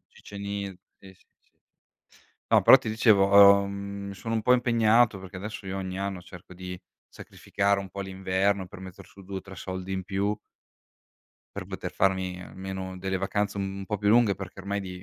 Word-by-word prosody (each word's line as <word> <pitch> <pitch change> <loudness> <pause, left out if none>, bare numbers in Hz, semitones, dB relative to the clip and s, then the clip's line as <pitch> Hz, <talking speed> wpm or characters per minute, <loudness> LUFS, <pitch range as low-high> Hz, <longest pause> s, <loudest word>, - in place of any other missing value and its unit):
sì, - - -15 0.6
sì, 95 -1 -15
sì. - - -28 1.3
No - - +6
però - - +9
ti - - -5
dicevo, 100 -3 +6
uhm, 100 0 -6
sono 115 +4 -5
un 110 - 0
po' 125 - +4
impegnato 115 -3 +3
perché 95 0 -10
adesso 105 +1 -7
io 95 +1 -4
ogni 95 0 -5
anno 100 -2 -3
cerco 90 0 -13
di 90 0 -7 0.3
sacrificare 100 0 -2
un 100 - -7
po' 100 +2 -7
l'inverno 95 0 -1
per 90 - -12
metter 95 -2 -11
su 100 - -16
2 95 +1 -6
o - - -9
3 95 0 -12
soldi 95 0 -6
in 95 -1 -3
più 100 +2 -1 1.2
per - - -4
poter - - -6
farmi 95 -2 0
almeno 95 0 -7
delle 95 +1 -2
vacanze 100 +2 -2
un 95 0 -4
po' 105 - -2
più 100 +1 +1
lunghe, 115 -3 +5
perché 95 0 -9
ormai 100 +1 -3
di 90 -2 -8
95 Hz, 180 wpm, -27 LUFS, 95-100 Hz, 1.3 s, però